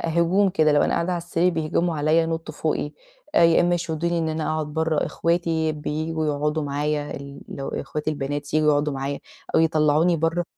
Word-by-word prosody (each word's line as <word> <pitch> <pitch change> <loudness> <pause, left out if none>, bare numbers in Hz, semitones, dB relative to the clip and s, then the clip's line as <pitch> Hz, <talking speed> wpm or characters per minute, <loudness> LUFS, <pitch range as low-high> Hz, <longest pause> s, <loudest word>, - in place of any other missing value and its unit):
هجوم 170 +4 +2
كده 155 -5 +3
لو 145 - +4
قاعدة 180 +2 +1
على 175 - -1
السرير، 170 +1 +1
بيهجموا 165 +1 0
عليّا، 155 +3 +3
ينطوا 165 0 -4
فوقي - - -2 0.4
آآ، 170 - +6
يا 165 -1 +5
إما 175 0 +3
يشدوني 170 0 -1
إن 160 -1 0
أنا 155 0 -2
أقعد 155 -1 -2
برّه، 160 0 0
إخواتي 165 -2 0
بييجوا 155 +1 -3
يقعدوا 150 +1 0
معايا، 145 +1 -2
ال 140 0 -9
لو 135 - -5
إخواتي 150 +2 -3
البنات 145 0 -4
ييجوا 155 0 +3
يقعدوا 145 0 +1
معايا، 135 +1 -3 0.3
أو - - +5
يطلّعوني 160 +1 +3
برّه. 165 +2 0
155 Hz, 180 wpm, -23 LUFS, 150-165 Hz, 0.4 s, آآ